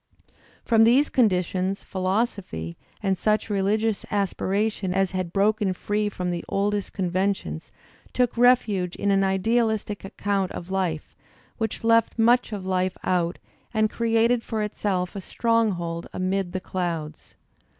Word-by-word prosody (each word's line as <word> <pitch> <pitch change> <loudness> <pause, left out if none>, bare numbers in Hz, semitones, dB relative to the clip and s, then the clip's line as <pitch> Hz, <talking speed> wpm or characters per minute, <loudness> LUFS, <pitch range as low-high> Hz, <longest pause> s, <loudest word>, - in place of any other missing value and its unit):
From 225 -2 +5
these 255 +6 +4
conditions 190 -4 +1
philosophy 185 - -2 0.3
and 195 -1 +2
such 215 +3 0
religious 210 +2 +1
aspi 200 -3 -1
^; - - -14
a - - -1
ration 195 -1 0
as 195 -1 +2
had 185 -2 -3
broken 205 0 +2
free 210 +3 -1
from 180 -3 -3
the 170 -1 -3
oldest 205 0 0
conventions 185 - -2 0.4
took 250 -2 +1
refuge 230 -7 +3
in 200 0 0
an 195 0 +3
idealistic 215 +2 0
account 195 -1 -1
of 175 +2 -7
life 180 -5 -2 0.4
which 220 0 -2
left 230 0 +3
much 235 +1 +4
of 200 -3 -5
life 185 0 0
out 175 -1 0 0.4
and 215 0 +2
created 230 +1 +2
for 220 -2 -3
itself 195 -3 -2
a 195 - -4
stronghold 185 -7 0
amid 185 0 -1
the 185 - -1
clouds. 165 -5 -4
195 Hz, 140 wpm, -25 LUFS, 185-220 Hz, 0.4 s, From